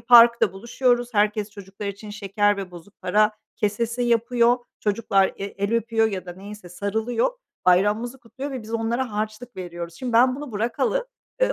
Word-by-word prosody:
parkta 235 Hz, -4 st, +7 dB
buluşuyoruz, 240 Hz, +3 st, 0 dB
herkes 210 Hz, 0 st, +2 dB
çocuklar 200 Hz, 0 st, -8 dB
için 200 Hz, +1 st, -6 dB
şeker 205 Hz, 0 st, +1 dB
ve 190 Hz, -2 st, -5 dB
bozuk 175 Hz, +4 st, -14 dB
para 215 Hz, +1 st, +3 dB, 0.2 s
kesesi 230 Hz, +3 st, -1 dB
yapıyor, 240 Hz, +1 st, +3 dB, 0.2 s
çocuklar 205 Hz, -2 st, +2 dB
e -, -, -5 dB
el 200 Hz, +2 st, -3 dB
öpüyor 225 Hz, -1 st, +2 dB
ya 190 Hz, -3 st, -5 dB
da 175 Hz, -, -6 dB
neyse 195 Hz, 0 st, -10 dB
sarılıyor, 220 Hz, -, -1 dB, 0.3 s
bayramımızı 210 Hz, +8 st, +3 dB
kutluyor 265 Hz, +4 st, -7 dB
ve 260 Hz, -4 st, -5 dB
biz 225 Hz, +1 st, -6 dB
onlara 230 Hz, +1 st, -1 dB
harçlık 215 Hz, +3 st, -4 dB
veriyoruz. 175 Hz, -2 st, -6 dB
Şimdi 245 Hz, +6 st, -4 dB
ben 255 Hz, +3 st, +5 dB
bunu 290 Hz, -5 st, -7 dB
bırakalı, 250 Hz, -, 0 dB, 0.4 s
ııı, -, -, +4 dB
220 Hz, 160 wpm, -24 LUFS, 200-240 Hz, 0.4 s, parkta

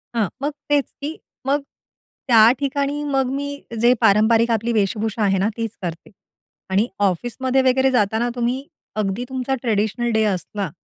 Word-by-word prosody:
हां, 220 Hz, -4 st, +2 dB
मग 290 Hz, +2 st, -1 dB, 0.2 s
तेच, 290 Hz, -1 st, +3 dB, 0.2 s
की 300 Hz, +3 st, -4 dB, 0.3 s
मग 285 Hz, +2 st, +2 dB, 0.7 s
त्या 225 Hz, -2 st, +7 dB
ठिकाणी 285 Hz, +1 st, -1 dB
मग 270 Hz, -3 st, 0 dB
मी 285 Hz, +1 st, -2 dB, 0.3 s
जे 240 Hz, +1 st, +6 dB
पारंपारिक 225 Hz, +2 st, +4 dB
आपली 230 Hz, +1 st, 0 dB
वेशभूषा 215 Hz, +1 st, 0 dB
आहे 195 Hz, -1 st, +2 dB
ना, 195 Hz, +2 st, +1 dB
तीच 225 Hz, -2 st, -2 dB
करते. 170 Hz, -2 st, -6 dB, 0.6 s
आणि 195 Hz, +4 st, +2 dB
ऑफिसमध्ये 240 Hz, +7 st, +1 dB
वगैरे 265 Hz, +1 st, +3 dB
जाताना 220 Hz, 0 st, +1 dB
तुम्ही 250 Hz, +3 st, -2 dB, 0.3 s
अगदी 200 Hz, +3 st, -2 dB
तुमचा 260 Hz, 0 st, -1 dB
ट्रेडिशनल 220 Hz, +1 st, 0 dB
डे 220 Hz, 0 st, +3 dB
असला, 195 Hz, -1 st, -2 dB
235 Hz, 150 wpm, -21 LUFS, 210-265 Hz, 0.7 s, त्या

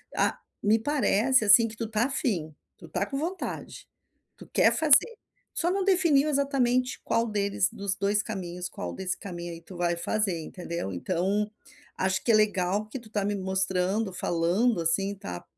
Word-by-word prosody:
Ah -, -, +1 dB, 0.3 s
me 215 Hz, +2 st, +3 dB
parece 255 Hz, -2 st, +2 dB
assim 225 Hz, +3 st, +7 dB
que 220 Hz, -, -9 dB
tu 230 Hz, -, -3 dB
está 220 Hz, +1 st, 0 dB
a 275 Hz, -, -2 dB
fim, 175 Hz, -, -2 dB, 0.2 s
tu -, -, -13 dB
está -, -, -2 dB
com 275 Hz, -, -5 dB
vontade, 345 Hz, +6 st, -5 dB, 0.5 s
tu -, -, -13 dB
quer -, -, +4 dB
fazer, 320 Hz, -, +5 dB, 0.4 s
só 345 Hz, +1 st, 0 dB
não 390 Hz, 0 st, 0 dB
definiu 330 Hz, -7 st, +3 dB
exatamente 255 Hz, -3 st, +1 dB
qual 230 Hz, -, +1 dB
deles, 200 Hz, -3 st, +1 dB
dos 200 Hz, -3 st, -2 dB
2 200 Hz, +2 st, +1 dB
caminhos, 180 Hz, -4 st, -5 dB
qual 85 Hz, -, -6 dB
desse 185 Hz, -1 st, -3 dB
caminho 175 Hz, -3 st, -7 dB
aí 165 Hz, -, -10 dB
tu 180 Hz, +2 st, -13 dB
vai 175 Hz, 0 st, 0 dB
fazer 190 Hz, 0 st, 0 dB
entendeu 170 Hz, -, -5 dB
então, 195 Hz, -, -1 dB, 0.5 s
acho 190 Hz, +1 st, 0 dB
que 235 Hz, -, +2 dB
é -, -, +6 dB
legal 205 Hz, -1 st, +1 dB
que 260 Hz, -, -6 dB
tu 220 Hz, -2 st, -16 dB
tá 205 Hz, -2 st, -1 dB
me 205 Hz, -, 0 dB
mostrando, 190 Hz, +1 st, 0 dB
falando 180 Hz, +6 st, +1 dB
assim, 195 Hz, +5 st, +1 dB
tá 90 Hz, -, -7 dB
205 Hz, 175 wpm, -27 LUFS, 180-240 Hz, 0.5 s, assim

